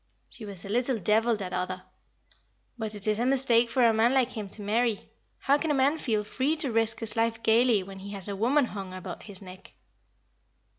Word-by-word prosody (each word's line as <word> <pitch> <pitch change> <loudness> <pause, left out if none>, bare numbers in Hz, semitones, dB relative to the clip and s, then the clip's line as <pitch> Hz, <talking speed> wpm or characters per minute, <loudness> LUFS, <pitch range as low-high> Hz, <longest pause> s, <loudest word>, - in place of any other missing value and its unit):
She 220 - -10
was 195 -3 -8
a - - -8
little 245 +3 0
devil, 220 +4 +2
that 190 -3 -6
other. 185 0 -3 0.9
But 220 -3 -4
it 205 - -4
is 215 0 +1
a 240 - +1
mistake 245 -3 +4
for 250 0 +3
a 230 - +5
man 230 +4 +3
like 255 -2 +2
him 210 -4 -6
to 210 - -6
marry. 225 +1 -1 0.3
How 280 +1 +2
can 320 - -2
a 295 - +2
man 275 +4 +2
feel 215 -4 -1
free 265 +8 -1
to 295 -5 -1
risk 225 0 +1
his 225 -2 0
life 230 0 0
gayly 225 -2 +4
when 195 0 -10
he 195 +1 -9
has 195 -1 -5
a 200 - -4
woman 255 +7 +2
hung 195 -5 -7
about 185 -1 -7
his 200 -2 -9
neck?" 185 0 -13
225 Hz, 215 wpm, -27 LUFS, 200-245 Hz, 0.9 s, a